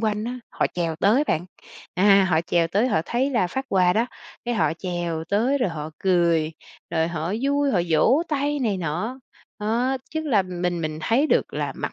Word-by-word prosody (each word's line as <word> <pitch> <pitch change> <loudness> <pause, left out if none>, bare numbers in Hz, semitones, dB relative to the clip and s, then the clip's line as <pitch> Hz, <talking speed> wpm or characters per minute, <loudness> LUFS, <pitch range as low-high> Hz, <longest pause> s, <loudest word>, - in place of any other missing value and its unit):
quanh 215 -1 -1
á, 250 +1 -4
họ - - +1
chèo 165 -3 -1
tới 215 - +3
bạn. 175 - -1 0.5
À, 195 +1 +5
họ 160 -1 +3
chèo 170 0 +1
tới 210 +9 +1
họ 160 - +2
thấy 260 +4 0
là 230 -8 +2
phát 265 +10 -4
quà 180 -2 +3
đó, 230 +4 +1 0.4
cái 240 0 -1
họ 155 -7 +2
chèo 175 -3 -3
tới 240 +8 +2
rồi 245 - +1
họ 155 -1 -6
cười, 170 -4 +2 0.4
rồi 165 -1 +1
họ 170 +2 -3
vui, 285 0 +2
họ 185 - +2
vỗ 235 - +4
tay 290 0 0
này 220 -7 0
nọ. 180 - -3 0.4
Ớ, 235 +5 0
chức 315 0 -3
là 215 -8 +3
mình 180 -1 -3
mình 155 -1 -3
thấy 255 - +2
được - - +1
là - - -2
mặc - - -4
195 Hz, 200 wpm, -24 LUFS, 170-245 Hz, 0.5 s, À